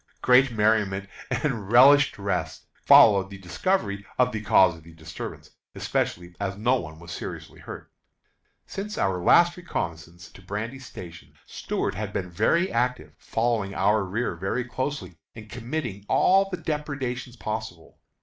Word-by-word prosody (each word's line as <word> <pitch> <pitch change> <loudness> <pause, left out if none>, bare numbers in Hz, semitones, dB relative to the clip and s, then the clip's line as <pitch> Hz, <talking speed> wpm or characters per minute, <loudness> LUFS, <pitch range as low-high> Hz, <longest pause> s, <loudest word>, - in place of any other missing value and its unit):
Great 130 +2 +5
merriment 105 -3 +1 0.2
and 115 -9 -2
relished 135 +3 +6
rest 80 -6 -3
followed 100 -3 +6
the 100 - -9
discovery 100 - -1
of 125 0 +3
the 110 - -4
cause 95 -4 +4
of 80 0 -15
disturbance, 80 -1 -9 0.2
especially 85 0 -2
as 95 -1 -3
no 120 +5 +2
one 80 -9 -8
was 85 +1 -11
seriously - - -7
hurt. - - -10 0.7
Since 210 +2 -6
our 95 -2 0
last 175 - +5
reconnoissance 85 - -6
to - - -15
Brandy 105 +7 -5
Station, 90 -9 -11
Stuart - - -3
has 105 +1 -4
been 95 -3 -4
very 170 - +1
active, 115 -11 -1
following 115 -4 -1
our 105 +2 +2
rear 105 +5 -2
very 95 +8 -2
closely, 130 - -4 0.2
and 110 -1 -11
committing 120 -4 -5
all 195 +1 +4
the 180 - -4
depredations 140 -6 -4
possible. 110 -7 -6
105 Hz, 140 wpm, -25 LUFS, 95-125 Hz, 0.7 s, relished